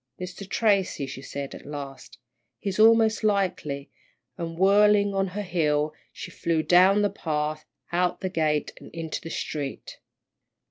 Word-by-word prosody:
Mr. 185 +2 -7
Tracy," 200 -9 +1
she 135 0 -8
said, 140 0 -6
at - - -10
last, 140 -2 -8 0.4
"he's 195 0 -4
most 225 0 +5
likely," 185 -9 -1 0.4
and 165 -1 -5
whirling 205 +2 +4
on 195 0 +1
her 200 +3 -4
heel, 155 -5 0 0.2
she - - -8
flew 165 -2 0
down 190 +4 +5
the 205 - +3
path, 155 -4 -3 0.3
out 180 +1 +1
the 190 - -1
gate, 155 -5 0
and - - -12
into 165 -1 -4
the 165 - -7
street. 145 -4 -5
180 Hz, 145 wpm, -26 LUFS, 150-200 Hz, 0.4 s, most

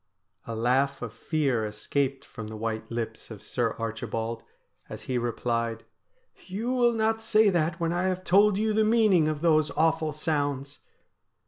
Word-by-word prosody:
A 115 - -4
laugh 130 +4 +1
of 115 -2 -6
fear 135 -2 0
escaped 130 +6 -2
from 110 -3 -8
the 110 - -7
white 110 0 -3
lips 115 -1 -4
of 105 -3 -10
Sir 120 -3 -1
Archibald 115 0 -3 0.5
as - - -8
he 125 -1 -1
replied: 115 -1 -2 0.3
' - - -27
You 215 +6 -3
will 240 -2 +3
not 225 0 +1
say 215 -2 +4
that 170 -1 0
when 170 0 0
I 175 +1 0
have 185 0 -1
told 200 +2 +4
you 215 +1 +1
the 220 +1 +3
meaning 215 -7 +4
of 155 -1 -2
those 155 -2 +3
awful 160 0 +2
sounds.' 145 -2 -2
145 Hz, 165 wpm, -27 LUFS, 115-185 Hz, 0.5 s, say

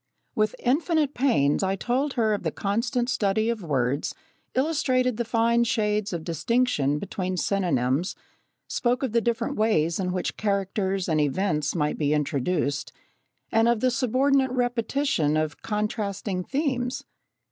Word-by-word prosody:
With 215 -1 +1
infinite 300 +2 +1
pains 225 - +2
I 190 0 +1
told 260 +7 -1
her 220 -3 +2
of 205 - -2
the - - -1
constant 240 +5 -1
study 220 -1 +1
of 230 -3 -4
words, 140 -4 -1 0.4
illustrated 255 -4 +1
the 240 - 0
fine 235 +1 +2
shades 210 -2 0
of 170 -3 -4
distinction 165 - +1
between 185 +1 -3
synonyms, 170 -5 0 0.5
spoke 245 +2 0
of 260 - -1
the 235 +1 +2
different 235 0 -1
ways 170 -7 +2
in 180 -1 -1
which 180 0 -3
characters 195 -2 -1
and 155 -3 +2
events 150 0 0
might 150 -3 0
be 150 0 +2
introduced, 145 0 -1 0.6
and 225 +1 +4
of 235 -2 +2
the 255 +2 +2
subordinate 265 +3 +2
repetition 245 - 0
of 155 -1 -2
contrasting 205 -3 -2
themes. 265 - -1
210 Hz, 140 wpm, -25 LUFS, 170-245 Hz, 0.6 s, and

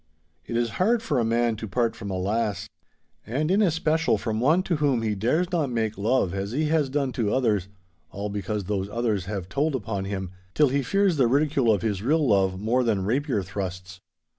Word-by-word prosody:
It 115 - -2
is 120 -1 0
hard 225 +4 +3
for 150 - 0
a - - +2
man 115 0 +1
to 110 - -6
part 115 +3 0
from 100 -3 -7
a 95 - -2
lass—and 110 - -4
in 200 +3 +3
especial 160 -3 +2
from 110 -2 -2
one 155 +9 +3
to 175 -4 -1
whom 140 -6 +1
he 110 -1 0
dares 155 - 0
not 160 -6 0
make 110 -3 -1
love 105 -2 +1
as 100 +2 -3
he 150 +3 0
has 155 -3 +2
done 135 -1 -1
to 110 -5 -1
others, 110 -8 +1 0.4
all 100 +1 -5
because 105 0 -3
those 100 0 -2
others 105 -4 -1
have 95 -2 -4
told 140 +8 0
upon 100 -5 -3
him, 95 -2 -4 0.2
till 150 -3 +4
he 140 +2 +1
fears 190 +6 +1
the 130 -4 +4
ridicule 140 -2 +2
of 105 -1 0
his 105 -4 -1
real 150 +5 +2
love 95 -3 +2
more 120 +5 +1
than 105 -5 0
rapier 125 -1 0
thrusts. 95 -1 -6
115 Hz, 205 wpm, -25 LUFS, 100-145 Hz, 0.4 s, till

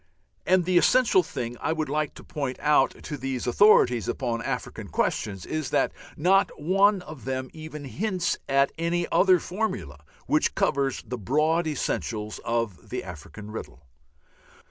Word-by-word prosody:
And 185 -1 +4
the 180 -1 +4
essential 250 -3 +4
thing 120 -7 -5
I 160 - 0
would 155 -1 -2
like 150 +1 -1
to - - -11
point 140 -4 -4
out 150 -2 +2
to 145 - -5
these 130 -2 -3
authorities 125 - +5
upon 120 -3 -2
African - - -4
questions 95 -4 -1
is 155 -4 -3
that - - +2 0.3
not 190 +5 +3
one 195 +4 +3
of 155 -6 -10
them 130 -1 -3
even 155 -2 -8
hints 185 +3 -1
at 140 0 +3
any 170 +1 0
other 185 -1 +5
formula 130 - -4 0.2
which - - +1
covers 135 -2 0
the 125 -1 -5
broad 155 - +1
essentials 110 - -3
of 115 -5 -3
the - - -3
African 95 +5 -9
riddle. 75 -9 -8
145 Hz, 150 wpm, -26 LUFS, 120-175 Hz, 0.3 s, authorities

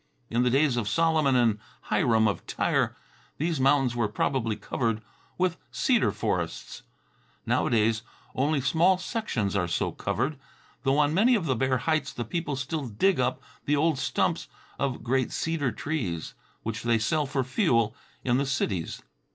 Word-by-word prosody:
In 120 +1 +2
the 125 - +3
days 135 0 +3
of 110 -4 -1
Solomon 155 +2 +3
and 115 -4 +3 0.3
Hiram 110 -2 +3
of 105 - -3
Tyre - - 0 0.4
these 160 -1 -1
mountains 135 -2 +3
were 120 -3 +1
probably 115 +1 0
covered 115 -1 -1 0.4
with 180 -1 +1
cedar 245 -4 +2
forests. - - -3 0.6
Nowadays 110 -1 +2 0.3
only 140 +2 +1
small 170 +7 +3
sections 175 - -2
are 90 -3 +1
so 85 - -1
covered, 140 +1 -2 0.4
though 135 +1 +2
on 150 0 +3
many 230 +8 +5
of 195 -7 -1
the 130 -4 +1
bare 130 +2 +1
heights 155 +2 0
the 120 - -4
people 165 +3 -2
still 140 +1 -3
dig 130 - +2
up 125 0 0 0.2
the 145 - +2
old 155 -1 +2
stumps - - 0 0.3
of 135 -3 -2
great 130 +1 +1
cedar 160 -6 -1
trees, 110 - -3 0.3
which 115 0 -3
they 120 -1 +2
sell 150 +6 0
for 135 -1 0
fuel 125 - +1 0.3
in 125 -1 +2
the 140 - +1
cities. 100 - -2
130 Hz, 160 wpm, -27 LUFS, 115-155 Hz, 0.6 s, many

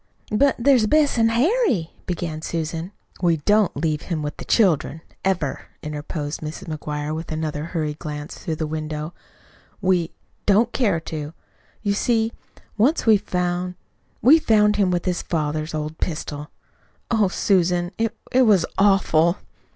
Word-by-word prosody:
"But 270 +6 +3
there's 245 -3 +4
Bess 295 -2 +3
an' 225 0 +4
Harry," 245 - +2 0.2
began 165 -3 -3
Susan, 165 +2 -3 0.3
"We 170 -3 +3
don't 205 +5 +2
leave 155 0 0
him 160 -4 -3
with 150 0 -4
the - - -8
children, 165 - +2 0.2
ever," 170 -8 -1 0.2
interposed 150 0 -4
Mrs. 155 +1 -6
McGuire, 150 -1 -4
with 160 +1 -5
another 155 -1 -3
hurried 155 -3 -3
glance 150 -1 -6
through 160 - -3
the 155 - -2
window. 155 +1 -4 0.7
"We 185 -4 +2 0.4
don't 220 +4 +4
dare 205 -10 +2
to. 155 -1 -6 0.5
You 200 -1 +1
see, 225 +1 +1 0.5
once 275 +10 +3
we 220 -2 +7
found 180 -1 -2 0.5
we 295 +8 +8
found 210 -6 +3
him 200 -3 +3
with 175 -1 -1
his 180 -1 0
father's 155 -1 -2
old 155 +1 -4
pistol. 150 -3 -4 0.6
Oh, 220 -3 +3
Susan, 180 -2 +1
it 225 0 -1
it 260 - +4
was 195 -6 +5
awful!" 195 -3 +4
175 Hz, 145 wpm, -22 LUFS, 155-210 Hz, 0.7 s, we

